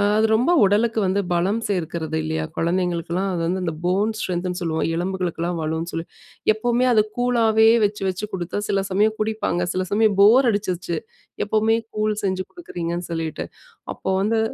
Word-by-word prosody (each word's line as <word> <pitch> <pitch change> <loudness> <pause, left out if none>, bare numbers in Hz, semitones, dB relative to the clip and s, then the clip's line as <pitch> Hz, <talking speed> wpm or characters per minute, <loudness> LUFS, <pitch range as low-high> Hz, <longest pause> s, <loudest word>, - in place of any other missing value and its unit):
அது 215 +1 +3
ரொம்ப 245 +9 +3
உடலுக்கு 220 +3 +2
வந்து 190 +2 +1
பலம் 185 +6 +1
சேர்க்கிறது 165 -4 -2
இல்லையா? 160 0 -2
குழந்தைகளுக்கெல்லாம் 175 +1 0
அது 170 - -2
வந்து 185 +2 -1
அந்த 165 -3 -2
போன் 200 +5 +1
ஸ்ட்ரென்த்னு 180 -1 -2
சொல்லுவோம். 160 -2 -1
எலும்புகளுக்கெல்லாம் 175 -1 -2
வலுன்னு 160 +2 -3
சொல்லி 165 0 -3 0.5
எப்பவுமே 240 +3 +1
அது 215 -2 +5
கூழாவே 225 -3 +4 0.2
வச்சு 205 0 -3
வச்சு 185 +3 -4
குடுத்தா 180 +1 -3
சில 195 -1 +1
சமயம் 210 +3 +2
குடிப்பாங்க, 215 -5 -1
சில 185 0 -1
சமயம் 210 -1 +3
போர் 240 +5 +6
அடிச்சிருச்சு. 185 -4 -2 0.5
எப்பவுமே 220 +2 +2 0.2
கூழ் 215 0 0
செஞ்சு 185 -1 -1
குடுக்குறீங்கன்னு 175 - -5
சொல்லிட்டு. 160 -2 -3 0.5
அப்போ - - -5
வந்து 220 +3 +1
190 Hz, 155 wpm, -22 LUFS, 175-215 Hz, 0.5 s, போர்